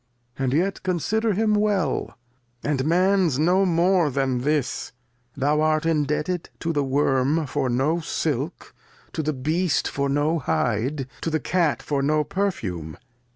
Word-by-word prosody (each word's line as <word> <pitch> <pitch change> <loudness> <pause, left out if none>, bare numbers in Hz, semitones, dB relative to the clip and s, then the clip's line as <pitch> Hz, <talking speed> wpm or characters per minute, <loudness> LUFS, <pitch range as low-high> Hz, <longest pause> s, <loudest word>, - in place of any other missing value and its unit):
And 135 -2 -1
yet 180 +7 0
consider 205 +5 0
him 215 +2 +2
well, 205 -8 0 0.5
and 140 -2 0
Man's 180 -2 +3
no 180 +5 +3
more 175 -1 +3
than 130 -2 0
this; 145 -1 -1 0.4
thou 145 +3 +2
art 155 0 +2
indebted 155 +2 0
to 165 - -1
the 145 -2 +1
Worm 140 +2 +1
for 135 -1 -1
no 135 +8 +1
Silk, 155 -2 -3 0.4
to 160 - -1
the 155 0 0
Beast 155 +5 0
for 140 0 -1
no 150 +4 +1
Hide, 130 +2 -1 0.2
to - - -1
the 160 0 0
Cat 165 +2 0
for 140 -2 -1
no 150 +2 +2
Perfume. 95 - -3
155 Hz, 145 wpm, -24 LUFS, 140-175 Hz, 0.5 s, Man's